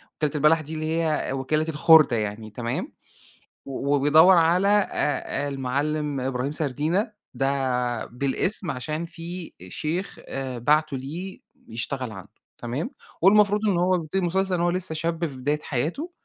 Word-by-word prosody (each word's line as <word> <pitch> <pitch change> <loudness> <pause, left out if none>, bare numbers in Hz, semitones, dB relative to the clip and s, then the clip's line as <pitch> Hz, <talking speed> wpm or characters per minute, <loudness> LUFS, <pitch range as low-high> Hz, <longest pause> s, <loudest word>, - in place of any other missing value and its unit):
وكِالة 150 -2 0
البَلَح 150 +2 +4
دي 155 +1 -7
اللي 160 +1 -1
هي 155 -4 -1
وكِالة 150 +4 0
الخُردة 155 -4 +6
يعني، 105 +1 -4
تمام؟ 115 +2 -4 0.7
و 140 +1 -1
وبيدوّر 155 +6 +6
على 170 +4 +3
أ 200 -8 +1
أ - - -2
المعلِّم 140 +2 -2
إبراهيم 130 +1 -2
سردينة، 155 - -1 0.2
ده 125 -3 -1
بالاسم 140 - 0
عشان 155 +6 -4
في 170 +1 -8
أ 90 - -10
شيخ 170 - -3
أ 130 -2 -4
بَعتُه 150 +3 +2
ليه 165 +9 -7 0.3
يشتغل 120 +2 -3
عنده، 95 -4 -11 0.3
تمام؟ 125 +6 -4 0.3
والمفروض 205 +2 +5
إن 195 -4 +2
هو 180 +1 +3
بيبتدي 165 +2 -4
المسلسل 190 +1 +1
إن 170 - -1
هو 175 - +2
لسهّ 180 -2 -1
شاب 165 +1 -1
في 135 -4 -9
بداية 145 +4 -1
حياته، 165 - -3
150 Hz, 150 wpm, -25 LUFS, 135-170 Hz, 0.7 s, الخُردة